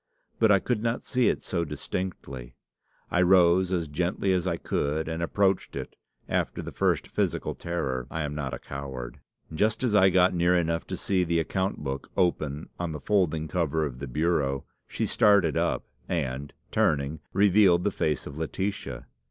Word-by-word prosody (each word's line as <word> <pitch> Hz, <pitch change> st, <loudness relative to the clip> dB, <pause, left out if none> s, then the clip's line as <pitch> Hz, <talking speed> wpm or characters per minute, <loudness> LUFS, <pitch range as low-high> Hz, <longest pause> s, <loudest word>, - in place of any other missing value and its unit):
But 110 Hz, -2 st, +5 dB
I 100 Hz, -, +7 dB
could 105 Hz, +3 st, -1 dB
not 115 Hz, +1 st, -1 dB
see 125 Hz, -2 st, +2 dB
it -, -, -2 dB
so 85 Hz, -2 st, -1 dB
distinctly. 75 Hz, -4 st, -5 dB, 0.6 s
I 90 Hz, -, +3 dB
rose 90 Hz, 0 st, +5 dB
as 85 Hz, -3 st, 0 dB
gently 90 Hz, +5 st, 0 dB
as 90 Hz, 0 st, 0 dB
I 85 Hz, -2 st, 0 dB
could, 80 Hz, 0 st, -1 dB
and 80 Hz, +1 st, -3 dB
approached 95 Hz, +3 st, +1 dB
it, -, -, -6 dB, 0.3 s
after -, -, -1 dB
the -, -, -6 dB
first -, -, +1 dB
physical -, -, -1 dB
terror. 65 Hz, -8 st, -3 dB
I 80 Hz, -, -3 dB
am 75 Hz, 0 st, -3 dB
not 75 Hz, -3 st, -3 dB
a -, -, -4 dB
coward. 65 Hz, -3 st, -7 dB, 0.3 s
Just 105 Hz, +10 st, +1 dB
as 120 Hz, -4 st, +1 dB
I 95 Hz, -2 st, +6 dB
got 90 Hz, 0 st, +4 dB
near 90 Hz, +1 st, +3 dB
enough 85 Hz, -1 st, 0 dB
to 95 Hz, -, -4 dB
see 95 Hz, +1 st, +1 dB
the 85 Hz, -1 st, +1 dB
account 95 Hz, +1 st, -2 dB
book 70 Hz, -1 st, -4 dB
open 80 Hz, -5 st, 0 dB
on 85 Hz, -2 st, -2 dB
the 75 Hz, -, -5 dB
folding 80 Hz, -4 st, +1 dB
cover 80 Hz, -2 st, 0 dB
of 60 Hz, -4 st, -6 dB
the 70 Hz, -, -5 dB
bureau, 70 Hz, -1 st, 0 dB, 0.2 s
she -, -, -2 dB
started 100 Hz, -7 st, +4 dB
up, -, -, 0 dB, 0.2 s
and, 70 Hz, -4 st, -2 dB, 0.2 s
turning, 70 Hz, +1 st, +1 dB
revealed 95 Hz, -2 st, +5 dB
the 105 Hz, -, +1 dB
face 75 Hz, -5 st, -1 dB
of 75 Hz, +2 st, -7 dB
Laetitia. 95 Hz, +5 st, -3 dB
85 Hz, 175 wpm, -27 LUFS, 75-95 Hz, 0.6 s, I